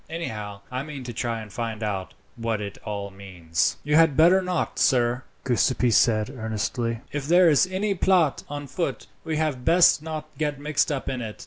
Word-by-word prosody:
Anyhow, 105 -11 -5
I 130 +1 -2
mean 145 -2 -7
to 120 -1 -6
try 115 0 -2
and 105 -2 -11
find 115 -2 -4
out 95 -3 -3 0.2
what 115 -2 -2
it 100 -1 -6
all 100 -1 -5
means." 90 -5 -2
"You 150 +2 +2
had 160 -4 +4
better 175 +4 +6
not, 180 -2 -2
sir," 125 -1 +2 0.2
Giuseppi 125 -1 +2
said 110 +1 +3
earnestly. 115 +1 -2
"If 145 -1 -4
there 175 +2 +6
is 155 +3 +4
any 195 +2 -1
plot 180 -5 +2
on 145 0 -5
foot 140 +6 -3 0.2
we 160 -1 -2
had 150 -5 -1
best 170 0 +5
not 155 -1 -5
get 150 -2 -1
mixed 150 +1 0
up 140 -2 -3
in 130 -2 -2
it. 110 -2 -7
130 Hz, 190 wpm, -25 LUFS, 110-155 Hz, 0.2 s, better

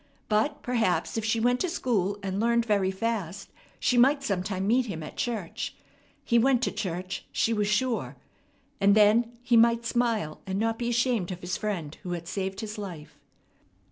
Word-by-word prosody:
But 220 +8 +1
perhaps, 230 -7 0
if 225 - -1
she 225 +1 +1
went 245 +2 +2
to 365 - 0
school 205 - 0
and 195 0 -2
learned 235 +1 +2
very 200 -4 +2
fast, 195 -2 -3 0.3
she 245 - +2
might 275 +3 +4
sometime 190 -3 -2
meet 245 +4 +2
him 165 -6 -5
at - - -9
church 220 -8 -3 0.5
he 235 -1 +4
went 255 +1 +3
to - - +1
church, 185 -2 -4
she 230 - +1
was 210 -2 0
sure 230 +3 0 0.6
and 200 +1 +5
then 225 +3 +4
he 245 -1 +2
might 235 0 +4
smile, 230 -10 0
and 190 0 -2
not 225 +1 0
be 240 -1 -1
ashamed 240 -5 +1
of 180 0 -6
his 175 +1 -3
friend 175 -8 -4
who 180 - -4
had 170 -1 -6
saved 190 0 -3
his 215 0 -6
life. 175 -7 -8
215 Hz, 180 wpm, -27 LUFS, 190-235 Hz, 0.6 s, and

